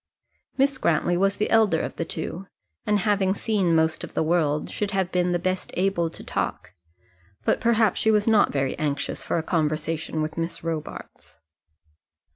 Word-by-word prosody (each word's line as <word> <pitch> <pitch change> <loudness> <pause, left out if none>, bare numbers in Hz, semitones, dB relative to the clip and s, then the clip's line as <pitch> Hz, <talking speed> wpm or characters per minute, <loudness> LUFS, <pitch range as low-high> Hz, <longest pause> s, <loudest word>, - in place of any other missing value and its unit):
Miss 275 0 +2
Grantly 170 +2 +2
was 195 +2 +1
the 210 - -1
elder 215 -7 +4
of - - -4
the 165 - -2
two, 170 +4 -6 0.4
and 210 -1 +2
having 200 -2 +2
seen 200 -6 +1
most 160 -1 +1
of - - -8
the - - +2
world, 155 -2 +1
should 210 - -2
have 190 -3 -1
been 180 0 +1
the 175 - +2
best 185 +1 -2
able 180 -3 +1
to - - -9
talk, - - -3 0.7
but - - +2
perhaps 225 -4 +3
she 220 - +2
was 210 -1 +3
not 220 -2 +4
very 135 -2 -1
anxious 145 -2 -2
for - - -1
a 165 - -1
conversation 155 -1 -1
with 155 +2 -4
Miss 165 +1 -4
Robarts. 165 -2 -6
175 Hz, 175 wpm, -25 LUFS, 160-205 Hz, 0.7 s, elder